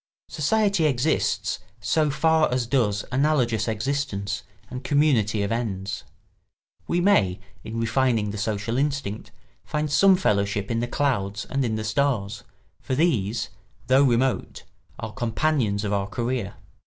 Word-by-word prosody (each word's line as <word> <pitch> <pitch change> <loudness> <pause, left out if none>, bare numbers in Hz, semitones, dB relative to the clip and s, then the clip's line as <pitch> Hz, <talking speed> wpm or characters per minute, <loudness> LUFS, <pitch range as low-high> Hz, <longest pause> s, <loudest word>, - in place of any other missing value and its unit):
Society 195 +3 +1
exists 145 +2 0 0.2
so 150 +10 +1
far 155 +1 +2
as 125 -1 0
does 115 -5 +1
analogous 125 -5 +1
existence 110 -4 -2 0.3
and 125 +1 -7
community 120 -9 +2
of 100 - -2
ends. 100 -5 -3 0.8
We 175 - +1
may, 105 - +3 0.2
in 115 +1 -5
refining 115 -2 +1
the 105 - -5
social 110 +3 -1
instinct, 140 -7 -2 0.3
find 150 -1 -2
some 190 +6 +6
fellowship 100 - 0
in 115 - 0
the 120 - -1
clouds 105 -7 -1
and 135 0 -1
in 115 -3 -1
the 110 - -3
stars, 110 -2 -1 0.4
for 130 - -3
these, 120 - +1 0.4
though 130 +2 +4
remote, 130 0 +1 0.3
are 110 -1 -6
companions 120 -4 0
of 105 -1 -1
our 100 -1 0
career. 120 -2 -3
120 Hz, 135 wpm, -24 LUFS, 105-145 Hz, 0.8 s, some